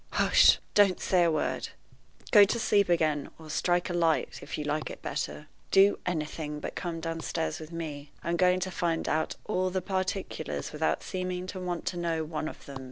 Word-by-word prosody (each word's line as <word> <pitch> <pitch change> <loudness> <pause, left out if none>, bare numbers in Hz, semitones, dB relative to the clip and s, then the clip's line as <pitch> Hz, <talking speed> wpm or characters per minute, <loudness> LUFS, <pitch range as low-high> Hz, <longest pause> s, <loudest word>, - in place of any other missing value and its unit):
Hush! - - +6 0.2
don't 200 -3 +5
say 180 -2 +3
a 165 - +3
word, 155 - -1 0.6
Go 205 - +9
to 200 +4 +2
sleep 200 -4 +3
again, 155 -4 +1
or 155 -1 -10
strike 175 +3 +1
a 175 - -3
light, 165 -2 +1
if - - -6
you 150 - -3
like 150 +1 -2
it - - -10
better. 150 - -4 0.2
Do 195 +1 +5
anything 150 -2 -3
but - - -5
come 170 -2 -4
downstairs 165 0 -3
with 155 +1 -9
me. 150 -4 -6
I'm 170 - 0
going 180 +1 +3
to 185 - -2
find 170 -2 -1
out 160 +1 0
all 185 -3 0
the 185 +1 -1
particulars 185 -4 -3
without 155 +1 0
seeming 185 -1 -3
to 190 - -6
want 180 -2 -3
to 180 - -2
know 165 -2 -1
one 155 0 -4
of - - -9
them. 140 -1 -8
170 Hz, 195 wpm, -29 LUFS, 155-185 Hz, 0.6 s, Go